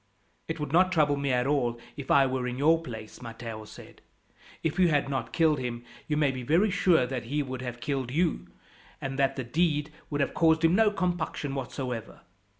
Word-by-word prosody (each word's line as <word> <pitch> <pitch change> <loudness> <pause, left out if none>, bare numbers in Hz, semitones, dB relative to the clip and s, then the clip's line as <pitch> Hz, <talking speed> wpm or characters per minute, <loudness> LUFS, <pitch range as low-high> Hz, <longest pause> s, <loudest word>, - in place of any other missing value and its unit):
"It 160 0 -4
would 150 -2 -3
not 185 +2 +5
trouble 150 -4 +3
me 140 -1 -1
at 125 0 +2
all 125 -5 0 0.2
if 140 -2 -8
I 140 -1 +6
were 130 -1 -1
in 125 0 -4
your 160 +4 +4
place," 110 -7 -9
Matteo 115 -2 -7
said. - - -13 0.6
"If 160 +3 -1
you 180 - +6
had 145 -4 +1
not 125 -4 -3
killed 155 -1 +3
him, 120 -1 -4 0.2
you 150 - 0
may 145 -3 +3
be 130 -1 -5
very 170 - +3
sure 180 -8 +3
that 125 -2 -4
he 145 +5 -1
would 130 -1 -6
have 120 -1 -5
killed 135 0 -2
you, 165 +5 0 0.5
and 135 0 -4
that 135 0 +2
the 130 - -3
deed 150 +3 0 0.2
would 145 -1 -1
have - - 0
caused 160 0 +3
him 165 - +4
no 220 +2 +5
compunction 175 -7 -2
whatever. 125 -3 -5
140 Hz, 205 wpm, -28 LUFS, 125-160 Hz, 0.6 s, I